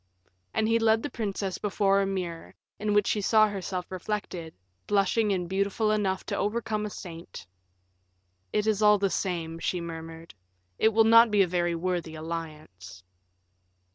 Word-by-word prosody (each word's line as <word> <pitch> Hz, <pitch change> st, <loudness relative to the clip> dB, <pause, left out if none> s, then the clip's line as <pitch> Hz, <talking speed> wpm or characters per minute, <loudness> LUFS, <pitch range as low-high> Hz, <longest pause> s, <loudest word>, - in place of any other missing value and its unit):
And 220 Hz, -, 0 dB
he 230 Hz, +1 st, +3 dB
led 225 Hz, 0 st, +3 dB
the 290 Hz, -, -4 dB
princess 200 Hz, -3 st, -3 dB
before 200 Hz, -1 st, +2 dB
a 195 Hz, -, 0 dB
mirror, 180 Hz, -4 st, -5 dB, 0.2 s
in 210 Hz, 0 st, 0 dB
which 205 Hz, -1 st, +4 dB
she 210 Hz, -, 0 dB
saw 215 Hz, +1 st, +5 dB
herself 185 Hz, -3 st, -5 dB
reflected, 185 Hz, -4 st, -5 dB, 0.3 s
blushing 205 Hz, +2 st, +2 dB
and 180 Hz, -3 st, -1 dB
beautiful 200 Hz, +3 st, 0 dB
enough 195 Hz, -3 st, 0 dB
to -, -, -3 dB
overcome 215 Hz, 0 st, -1 dB
a -, -, -6 dB
saint. 165 Hz, -, -9 dB, 1.1 s
"It 210 Hz, 0 st, 0 dB
is 215 Hz, -1 st, +1 dB
all 210 Hz, 0 st, +6 dB
the 195 Hz, -1 st, 0 dB
same," 165 Hz, -3 st, -2 dB
she 180 Hz, -, -1 dB
murmured; 165 Hz, 0 st, -8 dB, 0.5 s
"it 220 Hz, -, +5 dB
will 225 Hz, 0 st, +4 dB
not 230 Hz, +1 st, +7 dB
be 205 Hz, -2 st, +4 dB
a -, -, -1 dB
very 175 Hz, -1 st, 0 dB
worthy 170 Hz, -2 st, -2 dB
alliance." 155 Hz, -, -8 dB
195 Hz, 160 wpm, -27 LUFS, 170-210 Hz, 1.1 s, not